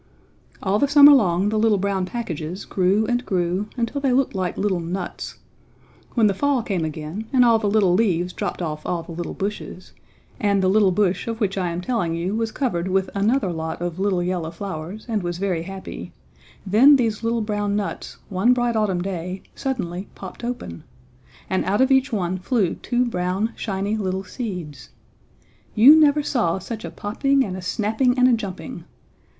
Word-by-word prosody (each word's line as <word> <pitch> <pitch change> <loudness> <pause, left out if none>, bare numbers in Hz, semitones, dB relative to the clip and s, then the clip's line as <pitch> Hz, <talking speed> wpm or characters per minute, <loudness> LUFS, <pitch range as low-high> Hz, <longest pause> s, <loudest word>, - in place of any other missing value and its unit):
All 200 +1 +1
the 285 - +3
summer 285 0 +8
long 195 -6 +3
the 215 0 0
little 220 -1 +3
brown 195 -1 -1
packages 180 -6 -5
grew 195 +3 +1
and 245 +2 0
grew 185 -1 -1
until 240 +4 -2
they 270 -2 +2
looked 270 +1 +2
like 185 -3 -2
little 195 -3 0
nuts. 175 +2 -5 0.8
When 230 -3 +4
the 205 - +3
fall 275 +3 +1
came 190 -6 -2
again 160 +7 -5
and 250 -2 +5
all 230 -1 +5
the 210 -2 0
little 200 -4 +3
leaves 180 -3 +1
dropped - - -3
off 155 -2 -4
all 170 -2 -2
the 165 - -11
little 170 0 -5
bushes, 195 -2 -5 0.5
and 200 -2 +2
the - - +3
little 205 0 +4
bush 190 +1 0
of 230 -1 -3
which 200 -4 0
I 185 -3 -1
am 170 +1 -3
telling 180 -6 -1
you 175 +4 -2
was 225 0 -1
covered 190 -11 -1
with 190 0 0
another 205 -1 +1
lot 160 0 -4
of 175 0 -4
little 190 -3 +1
yellow 175 -3 -2
flowers 180 +2 -7
and 220 -3 -1
was 175 -1 -3
very 185 -3 -1
happy, 190 +2 -8 0.5
then 235 +9 +6
these 225 -5 0
little 230 0 0
brown 205 -1 -1
nuts, 205 -1 -4
one 195 +6 +3
bright 240 -1 0
autumn 195 -5 0
day, 185 0 -5
suddenly 200 -9 -4
popped 190 +4 -10
open! 235 - -5 0.6
And 190 - 0
out 195 +3 +1
of 260 +1 +3
each 265 0 +3
one 185 -4 -1
flew 190 -2 0
two 245 0 -1
brown 190 +1 -1
shiny 200 0 -2
little 190 -2 -2
seeds. 180 - -6 0.9
You 255 +8 +9
never 300 -1 +4
saw 225 - 0
such 220 +4 -6
a - - -5
popping 275 +6 0
and 185 -3 -5
a 185 - -6
snapping 220 +7 0
and 250 0 +5
a 255 - +4
jumping! 200 -5 -5
200 Hz, 185 wpm, -22 LUFS, 180-230 Hz, 0.9 s, You